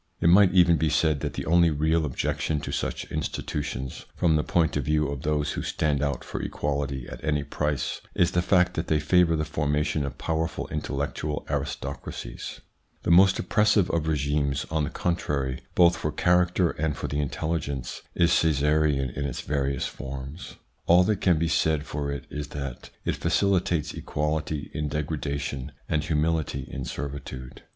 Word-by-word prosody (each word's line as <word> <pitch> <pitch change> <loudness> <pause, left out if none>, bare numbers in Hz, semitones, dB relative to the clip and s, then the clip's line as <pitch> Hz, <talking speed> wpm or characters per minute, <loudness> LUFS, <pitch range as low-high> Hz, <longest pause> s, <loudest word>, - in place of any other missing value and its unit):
It 85 - +4
might 95 +1 +7
even 85 -2 +5
be 80 - +1
said 75 0 +2
that - - -3
the - - -4
only 85 +1 +5
real 80 +2 +1
objection 75 +2 -1
to - - -5
such - - -2
institutions, 70 -3 -4
from 80 -3 +3
the 75 - +3
point 85 -2 +1
of 75 - 0
view 75 0 +2
of 70 -2 -4
those 75 -1 0
who - - -3
stand 75 -2 0
out 70 -1 -1
for - - -5
equality 70 -3 -2
at - - -9
any 75 -2 +1
price, 75 -2 -2
is 85 -1 +3
the 90 - +2
fact 90 0 +3
that 80 - -3
they 80 - +2
favour 85 +2 +4
the 75 -1 -1
formation 75 -1 0
of 70 - -5
powerful 80 0 -2
intellectual 70 +2 -3
aristocracies. 65 -3 -5 0.4
The - - +1
most 95 +2 +7
oppressive 105 0 +3
of 80 -2 0
regimes, 70 -2 0
on 80 -2 +1
the - - -4
contrary, 75 -7 -1
both 85 0 +5
for 75 - -2
character 90 +1 +3
and 75 -1 -2
for - - -3
the 70 - -2
intelli 80 +4 -1
gence, 70 -4 -5
is 85 - +3
Caesarism 75 -3 +2
in 70 - -2
its 65 - -3
various 70 -1 -1
forms. 70 +4 -7 0.3
All 90 +2 +7
that 100 +1 0
can 90 -4 +4
be 85 +2 +1
said 80 -2 +1
for 70 -1 -3
it 70 - -5
is 75 -1 -4
that 70 -4 -6 0.2
it - - 0
facilitates 90 -6 +1
equality 75 0 -2
in 75 -1 -2
degradation 70 -2 -3
and 75 -1 0
humility 75 -4 0
in 65 -2 -4
servitude. 65 -2 -6
75 Hz, 175 wpm, -26 LUFS, 70-85 Hz, 0.4 s, might